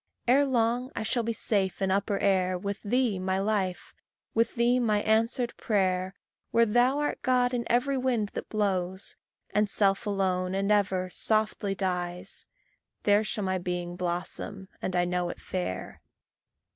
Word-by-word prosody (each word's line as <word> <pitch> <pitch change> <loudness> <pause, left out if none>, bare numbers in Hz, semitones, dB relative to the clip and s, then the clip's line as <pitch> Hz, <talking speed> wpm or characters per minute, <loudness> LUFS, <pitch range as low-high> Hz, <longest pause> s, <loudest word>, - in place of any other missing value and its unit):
Ere 275 +4 +5
long 245 +1 +1
I - - -2
shall 240 +2 +1
be 230 0 -1
safe 200 -4 0
in 195 -1 +1
upper 200 +1 +1
air, 185 -2 +2
With 200 +2 -4
thee, 230 -2 +1
my 190 0 0
life 195 -3 -1 0.4
with 230 0 +1
thee, 240 +1 +3
my 215 -4 +1
answered 230 +3 +1
prayer 190 -3 0 0.3
Where 230 0 +4
thou 245 +5 +3
art 295 0 -1
God 250 -1 +2
in 240 -1 -1
every 260 +3 +2
wind 240 -5 0
that - - -5
blows, 190 -3 -1 0.4
And 210 0 +2
self 195 +1 +2
alone, 185 -2 0
and 195 +1 0
ever, 185 -3 +1
softly 215 -2 0
dies, 180 -1 -3 0.6
There 205 +1 +4
shall 210 -1 -3
my 185 -1 0
being 175 0 -3
blossom, 180 +2 -3
and 185 - -2
I 175 0 +3
know 180 0 -1
it - - -7
fair. 180 - -4
200 Hz, 160 wpm, -28 LUFS, 185-230 Hz, 0.6 s, Ere